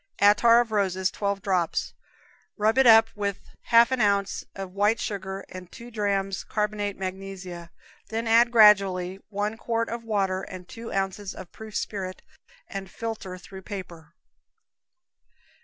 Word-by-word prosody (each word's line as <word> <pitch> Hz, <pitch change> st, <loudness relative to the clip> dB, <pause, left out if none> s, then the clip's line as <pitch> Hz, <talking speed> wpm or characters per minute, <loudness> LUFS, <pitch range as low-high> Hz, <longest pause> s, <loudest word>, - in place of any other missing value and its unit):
Attar 220 Hz, +4 st, +6 dB
of 235 Hz, -2 st, -5 dB
rose, 190 Hz, -3 st, +1 dB
twelve 200 Hz, -1 st, -2 dB
drops; 180 Hz, -4 st, 0 dB, 0.6 s
rub 220 Hz, +4 st, +2 dB
it 265 Hz, -, +6 dB
up 225 Hz, 0 st, +8 dB
with 200 Hz, -1 st, -2 dB, 0.3 s
half 235 Hz, +1 st, +6 dB
an 260 Hz, -2 st, +1 dB
ounce 200 Hz, -1 st, +1 dB
of 195 Hz, -2 st, -7 dB
white 210 Hz, +3 st, +2 dB
sugar 190 Hz, -1 st, -4 dB
and 185 Hz, -1 st, -10 dB
two 235 Hz, +1 st, -11 dB
drams 200 Hz, -3 st, -1 dB
carbonate 210 Hz, -1 st, -2 dB
magnesia, 185 Hz, -2 st, -6 dB, 0.4 s
then 225 Hz, +1 st, -2 dB
add 230 Hz, +1 st, +5 dB
gradually 195 Hz, -5 st, +5 dB
one 210 Hz, +1 st, -2 dB
quart 230 Hz, 0 st, -1 dB
of 235 Hz, 0 st, -5 dB
water 195 Hz, -4 st, 0 dB
and 185 Hz, -2 st, -9 dB
two 230 Hz, 0 st, -8 dB
ounces 195 Hz, 0 st, -2 dB
of 185 Hz, -2 st, -10 dB
proof 220 Hz, -1 st, -10 dB
spirit, 185 Hz, -3 st, -4 dB, 0.4 s
and 195 Hz, -2 st, -6 dB
filter 210 Hz, -4 st, -5 dB
through 190 Hz, +1 st, -11 dB
paper. 180 Hz, -5 st, -9 dB
200 Hz, 140 wpm, -26 LUFS, 190-220 Hz, 0.6 s, up